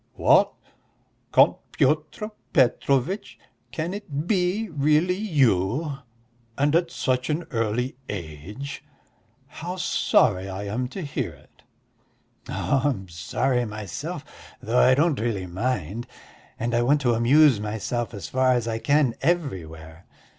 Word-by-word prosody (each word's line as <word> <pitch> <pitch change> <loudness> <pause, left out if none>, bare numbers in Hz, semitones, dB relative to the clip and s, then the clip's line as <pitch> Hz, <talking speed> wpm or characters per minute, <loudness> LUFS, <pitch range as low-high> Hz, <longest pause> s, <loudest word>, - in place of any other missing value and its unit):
"What, - - +4 0.8
Count - - +5 0.2
Pyotr 155 +9 0 0.2
Petrovitch?... 135 - +1 0.3
Can 165 +3 -3
it 155 -8 -5
be 190 +2 +1
really 155 +2 +2
you... 140 - +1 0.6
and 145 +2 +2
at 170 0 +2
such 130 -5 -1
an 155 +3 -1
early 115 +2 -1
age? 100 - -7 0.6
How 175 +3 -6
sorry 100 - +2
I 95 +1 -5
am 110 +5 -2
to 185 +8 -6
hear 145 - -3
it." - - -22 0.9
"Oh, 135 - 0
I - - +4
am 95 -9 -4
sorry 125 +10 0
myself, 105 -4 -6 0.3
though 120 +3 +1
I 130 - +6
really 125 - +1
don't 90 -1 -9
mind, 110 0 -2 0.5
and 120 +1 -2
I 120 - +3
want 145 +4 +3
to 120 -3 +2
amuse 130 +2 +5
myself 110 +2 -3
as 95 -6 -6
far 130 +3 +2
as 120 -2 0
I 115 -1 -2
can 145 -2 +2
everywhere. 85 - -3
130 Hz, 130 wpm, -25 LUFS, 105-150 Hz, 0.9 s, I